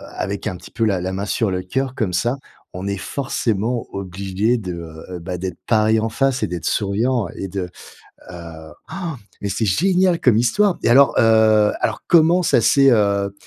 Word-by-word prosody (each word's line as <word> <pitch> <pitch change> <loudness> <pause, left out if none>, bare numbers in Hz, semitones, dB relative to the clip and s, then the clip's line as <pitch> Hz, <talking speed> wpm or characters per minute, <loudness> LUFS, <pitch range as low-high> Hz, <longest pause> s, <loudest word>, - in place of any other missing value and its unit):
avec 100 +1 -4
un 95 - -3
petit - - -13
peu 115 -1 -1
la 95 -4 0
la 95 +1 -3
main 95 +2 -3
sur 105 -1 -1
le 90 0 -2
cœur 130 +7 -3
comme 105 -9 -2
ça, 120 +9 0 0.4
on 95 +2 -5
est 100 0 -2
forcément 115 -1 -2
obligé 100 +4 -1
de, 95 -6 -5
heu 80 -2 -9
heu, - - -6
bah, 90 +1 -5
d'être 90 -1 -5
pareil 110 0 +3
en 110 +1 -1
face 135 +3 0
et - - +1
d'être 90 -1 -6
souriant 110 +2 0
et 95 - -5
de, 95 -2 -4 0.6
heu 80 -2 -10 0.2
han, 175 -5 -4 0.3
mais 100 - -3
c'est 110 +3 -1
génial 180 - +2
comme 115 -4 +3
histoire! 175 - +2
Et - - +2
alors, 135 +3 +5
heu, 110 -2 +4
alors, - - -2
comment 170 +2 +4
ça 140 - +3
s'est, 135 +3 +5
heu 100 -3 +1
105 Hz, 195 wpm, -20 LUFS, 95-125 Hz, 0.6 s, alors